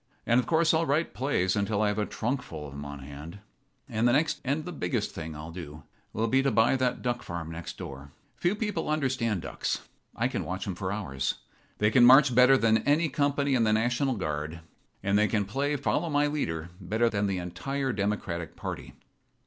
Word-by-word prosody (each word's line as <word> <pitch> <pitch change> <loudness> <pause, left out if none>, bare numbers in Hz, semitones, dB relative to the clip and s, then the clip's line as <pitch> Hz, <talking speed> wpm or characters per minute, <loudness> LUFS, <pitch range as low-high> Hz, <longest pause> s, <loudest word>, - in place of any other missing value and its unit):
And, 120 +1 +4
of 125 - -1
course, 165 0 +3
I'll 160 0 +2
write 150 +4 +1
plays 105 -9 +1
until 100 +1 +1
I 105 - +3
have 105 +1 -1
a 105 - 0
trunk 125 +4 -2
full 75 -9 -8
of 70 - -10
'em 70 0 -6
on 70 0 -7
hand. 75 +6 -9 0.5
"And 115 -1 +1
the 120 - +4
next 155 +4 +1
thing 130 - -2
and 155 +2 -1
the 180 - -5
biggest 90 - -2
thing 80 0 -6
I'll 80 +2 -7
do 80 -4 -8 0.3
will 110 - -1
be 130 +4 +3
to 135 - +2
buy 115 +2 +4
that 130 -1 0
duck 120 -1 -1
farm 85 -2 -5
next 80 +1 -7
door. 70 +1 -8 0.2
Few 175 +4 +1
people 210 -8 -2
understand 130 - 0
ducks. - - -3 0.3
I - - +1
can - - -3
watch 95 +1 -4
'em 95 - -2
for 95 +1 -3
hours. 70 - -2 0.4
They 105 0 +2
can 125 +2 +6
march 130 +2 +8
better 125 +2 +7
than 110 -2 +3
any 150 +7 +2
company 140 0 +1
in 120 -3 +3
the 110 -1 +3
National 120 +4 +1
Guard, 80 -3 -3 0.4
and 100 +1 +3
they 105 - +4
can 105 -1 0
play 140 +8 -1
'follow 150 +4 0
my 145 -1 +3
leader' 85 - -2
better 110 +6 +1
than 105 -3 0
the 95 -1 -1
entire 135 +10 -3
Democratic 100 -5 -2
party. - - -6
110 Hz, 215 wpm, -28 LUFS, 90-135 Hz, 0.5 s, march